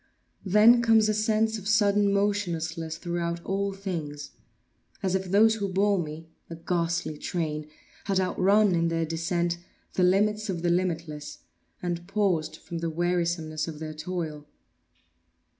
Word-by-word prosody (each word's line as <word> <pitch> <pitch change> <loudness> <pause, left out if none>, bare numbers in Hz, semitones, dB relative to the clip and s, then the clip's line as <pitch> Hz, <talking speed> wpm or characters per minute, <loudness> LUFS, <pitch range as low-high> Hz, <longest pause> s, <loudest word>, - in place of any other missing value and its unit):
Then 215 +5 +6
comes 225 -2 +4
a - - +2
sense 220 +1 +1
of 200 - -8
sudden 205 -1 +3
motionlessness 170 -6 -1
throughout 170 0 -3
all 200 +1 -1
things; 160 -7 -5 0.7
as 190 -1 0
if 190 0 0
those 210 +4 +5
who 200 -3 -2
bore 200 +1 +2
me 160 0 -6 0.2
(a 165 - -6
ghastly 170 -2 -2
train!) 155 -3 -3 0.4
had 195 -2 +1
outrun, 195 +2 +3
in 170 -1 +2
their 165 0 0
descent, 170 +1 -1 0.3
the - - 0
limits 210 +3 +2
of 175 -3 -3
the 175 - +2
limitless, 165 -4 -2 0.4
and 175 -1 -3
paused 195 -6 0
from 170 - -7
the 165 0 -2
wearisomeness 170 -2 -1
of 160 -2 -6
their 155 0 -6
toil. 155 -2 -5
175 Hz, 140 wpm, -27 LUFS, 165-200 Hz, 0.7 s, Then